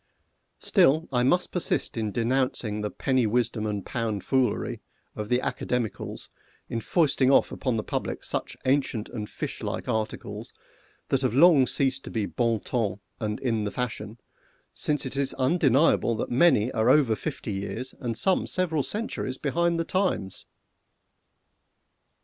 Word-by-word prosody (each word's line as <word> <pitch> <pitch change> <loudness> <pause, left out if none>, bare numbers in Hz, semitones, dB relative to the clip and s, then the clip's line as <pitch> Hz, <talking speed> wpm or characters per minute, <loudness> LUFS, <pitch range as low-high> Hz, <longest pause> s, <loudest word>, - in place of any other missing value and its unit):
Still 155 +5 +3
I 125 - +3
must 175 +9 +2
persist 180 - -1
in 110 -2 -2
denouncing 120 -2 0
the 105 - -2
penny 130 -2 +1
wisdom 115 -1 0
and 105 -2 -3
pound 110 -5 -2
foolery 130 -5 0 0.3
of 105 0 -5
the 125 - +4
Academicals 125 -2 -3 0.4
in 115 - -3
foisting 140 -1 +2
off 135 - +4
upon 130 -4 -1
the 110 - -1
public - - -3
such - - -3
ancient 130 -5 +1
and 105 -3 -5
fish - - -5
like - - -4
articles 110 -1 -3 0.6
that 135 - +2
have 130 -3 0
long 145 -3 +6
ceased 135 -1 0
to - - -6
be 110 -3 -1
bon 115 0 0
ton 105 -6 -1 0.2
and 105 -1 -2
in 115 -5 0
the 105 - -1
fashion, 115 -1 -4 0.6
since 150 -2 -1
it 130 - -5
is 140 -1 0
undeniable 135 -3 +3
that - - -3
many 125 -4 +4
are 110 +1 +2
over 130 -5 +5
fifty 135 -4 -5
years, 105 +6 -4
and 115 -3 -3
some 190 +6 +2
several 165 -5 +1
centuries 205 - -3
behind 170 +3 0
the 165 - 0
times! 180 - -1
125 Hz, 150 wpm, -26 LUFS, 110-140 Hz, 0.6 s, long